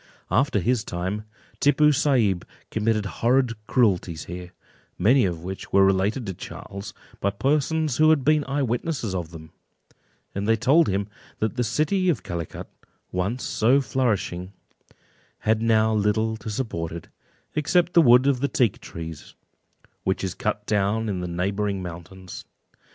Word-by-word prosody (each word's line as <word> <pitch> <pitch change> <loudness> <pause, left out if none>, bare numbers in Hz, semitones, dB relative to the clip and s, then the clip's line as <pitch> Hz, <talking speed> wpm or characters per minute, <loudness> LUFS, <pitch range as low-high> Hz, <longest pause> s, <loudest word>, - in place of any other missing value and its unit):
After 135 -1 +2
his 115 +3 +1
time, 95 +5 -4 0.3
Tippoo 150 +1 +4
Saib 125 - +2 0.3
committed 110 -1 0
horrid 120 +5 +1
cruelties 95 - +1
here, 90 0 -8 0.5
many 120 +6 +4
of 85 -3 -3
which 95 +1 -7
were 100 0 +6
related 95 +6 +1
to 95 - -4
Charles, 100 +3 -8 0.2
by 100 - +1
persons 145 +5 0
who 155 0 +5
had 155 -4 +4
been 150 +1 +3
eyewitnesses 135 - -1
of 85 -4 -3
them; 80 -2 -11 0.8
and 100 +1 -3
they 115 - +4
told 135 +9 +4
him 100 +1 -1 0.3
that 110 +1 -1
the 125 - 0
city 170 - +1
of 150 -10 0
Calicut, 85 -2 -5 0.4
once 100 +8 -2
so 125 +5 +3
flourishing, 105 -9 -1 0.9
had 110 0 +1
now 110 -1 +3
little 110 +1 +1
to 110 +1 -7
support 100 -8 -3
it, 85 0 -8 0.5
except 175 +3 +2
the 170 - +7
wood 125 -2 +6
of 140 -3 +2
the 140 - +1
teak 120 -7 +1
trees, 80 -2 -8 0.7
which 95 +1 -1
is 95 -2 -2
cut 105 +2 -2
down 105 +2 0
in 95 -3 -2
the 90 - -3
neighbouring 95 +3 -1
mountains. 90 +1 -9
110 Hz, 150 wpm, -24 LUFS, 95-130 Hz, 0.9 s, the